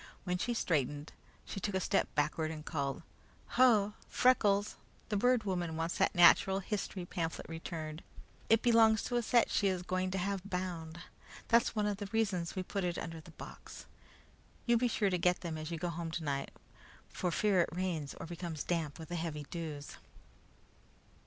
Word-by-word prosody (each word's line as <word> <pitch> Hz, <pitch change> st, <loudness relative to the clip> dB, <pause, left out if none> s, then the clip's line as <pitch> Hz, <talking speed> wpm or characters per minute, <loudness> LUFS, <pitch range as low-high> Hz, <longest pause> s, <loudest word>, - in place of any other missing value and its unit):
When 180 Hz, -1 st, -1 dB
she 240 Hz, +4 st, -1 dB
straightened, 145 Hz, -, -1 dB, 0.3 s
she -, -, -5 dB
took 200 Hz, 0 st, -2 dB
a -, -, +2 dB
step -, -, +1 dB
backward 155 Hz, +2 st, +1 dB
and 155 Hz, -1 st, -7 dB
called: 140 Hz, -1 st, -2 dB, 0.5 s
"Ho! 220 Hz, -5 st, +4 dB, 0.2 s
Freckles, 210 Hz, -5 st, +3 dB, 0.3 s
the 210 Hz, -, 0 dB
Bird 245 Hz, +2 st, +3 dB
Woman 175 Hz, -5 st, -2 dB
wants 165 Hz, +1 st, -2 dB
that -, -, +2 dB
natural 180 Hz, +2 st, +6 dB
history 195 Hz, -2 st, -3 dB
pamphlet 165 Hz, -2 st, -3 dB
returned. 160 Hz, -1 st, -6 dB, 0.5 s
It 225 Hz, 0 st, +5 dB
belongs 225 Hz, -2 st, +5 dB
to 245 Hz, -, -1 dB
a -, -, +2 dB
set 235 Hz, 0 st, +3 dB
she 200 Hz, -, +2 dB
is 185 Hz, -2 st, 0 dB
going 185 Hz, 0 st, -1 dB
to 190 Hz, -, -2 dB
have 195 Hz, +1 st, -1 dB
bound. 175 Hz, -4 st, -4 dB, 0.5 s
That's 235 Hz, 0 st, +4 dB
one 210 Hz, -1 st, +1 dB
of 205 Hz, -1 st, 0 dB
the 205 Hz, 0 st, -5 dB
reasons 200 Hz, -7 st, 0 dB
we 185 Hz, -, -2 dB
put 195 Hz, +1 st, -3 dB
it 175 Hz, -1 st, -1 dB
under 165 Hz, -1 st, -5 dB
the 155 Hz, -, -15 dB
box. -, -, -10 dB, 0.8 s
You 240 Hz, -, +4 dB
be 245 Hz, +2 st, +3 dB
sure 210 Hz, -4 st, +1 dB
to 180 Hz, -, +1 dB
get 180 Hz, +1 st, +2 dB
them 170 Hz, -3 st, -4 dB
as 155 Hz, 0 st, -5 dB
you 170 Hz, -, -3 dB
go 175 Hz, +2 st, -2 dB
home 170 Hz, 0 st, -4 dB
tonight, 145 Hz, -4 st, -2 dB, 0.6 s
for 180 Hz, -, -2 dB
fear 190 Hz, +1 st, +3 dB
it -, -, 0 dB
rains 170 Hz, -5 st, -2 dB
or -, -, -5 dB
becomes 170 Hz, -2 st, -5 dB
damp 165 Hz, -4 st, -2 dB
with 160 Hz, -1 st, -9 dB
the 175 Hz, -, -3 dB
heavy 160 Hz, -3 st, -3 dB
dews." 155 Hz, -4 st, -6 dB
180 Hz, 185 wpm, -33 LUFS, 165-205 Hz, 0.8 s, natural